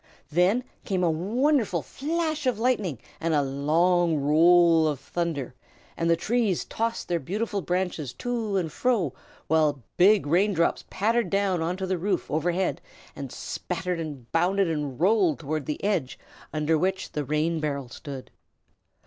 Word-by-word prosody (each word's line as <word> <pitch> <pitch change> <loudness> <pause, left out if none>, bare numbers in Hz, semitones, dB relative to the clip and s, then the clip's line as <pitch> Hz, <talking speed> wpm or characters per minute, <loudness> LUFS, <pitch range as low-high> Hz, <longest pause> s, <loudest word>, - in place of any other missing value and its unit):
Then 180 +10 +3 0.2
came 185 -2 -1
a 170 - +3
wonderful 215 - +1
flash 310 0 -2
of 250 -4 +1
lightning 220 - 0 0.2
and 165 -1 0
a 145 - +3
long 160 +5 +2
roll 165 +2 +5
of 145 -4 -1
thunder, 145 -3 -3 0.4
and 165 0 0
the 170 - +5
trees 215 +1 0
tossed 230 +1 -2
their 170 -1 0
beautiful 205 - -2
branches 180 -7 -2
to 230 -5 -2
and 165 -4 -1
fro, 210 - 0 0.3
while 150 -4 +2
big 195 +1 +5
rain 185 +7 +2
drops 170 -1 +1
pattered 225 0 +1
down 195 -3 +1
on 170 +3 -1
to 190 - -3
the 185 -1 -1
roof 190 0 -1
overhead 175 +5 0 0.3
and - - -6
spattered 180 0 -4
and 145 -7 -7
bounded 185 +3 +2
and 150 -5 -3
rolled 185 - +3
toward 155 +1 -4
the 150 - -4
edge 160 -10 0 0.3
under 155 +1 +1
which 190 +2 -1
the 150 - -2
rain 155 +4 0
barrel 140 -3 -2
stood. 135 +1 -9
175 Hz, 155 wpm, -26 LUFS, 155-200 Hz, 0.4 s, roll